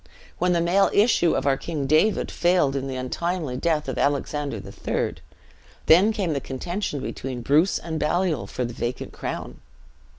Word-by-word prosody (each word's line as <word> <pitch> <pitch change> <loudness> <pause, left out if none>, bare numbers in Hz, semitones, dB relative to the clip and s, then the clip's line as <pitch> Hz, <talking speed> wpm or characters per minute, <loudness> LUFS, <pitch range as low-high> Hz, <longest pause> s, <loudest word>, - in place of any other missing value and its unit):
When 180 0 +2
the 170 - +2
male 185 +4 +3
issue 200 -6 +4
of - - -1
our 135 -1 +3
King 155 -3 -4
David 155 +10 +2
failed 175 -6 +2
in 135 0 -2
the 135 - -4
untimely 150 +3 -2
death 155 +2 0
of - - -3
Alexander 145 -2 -1
III., 100 - -3 0.7
then 185 +7 +6
came 190 -7 -1
the 140 - -2
contention 150 +3 -4
between 130 -2 -5
Bruce 155 +9 +3
and 160 -2 -4
Baliol 155 - 0
for 125 - -3
the 120 - -5
vacant 120 +2 -4
crown. - - -5
155 Hz, 165 wpm, -24 LUFS, 135-175 Hz, 0.7 s, then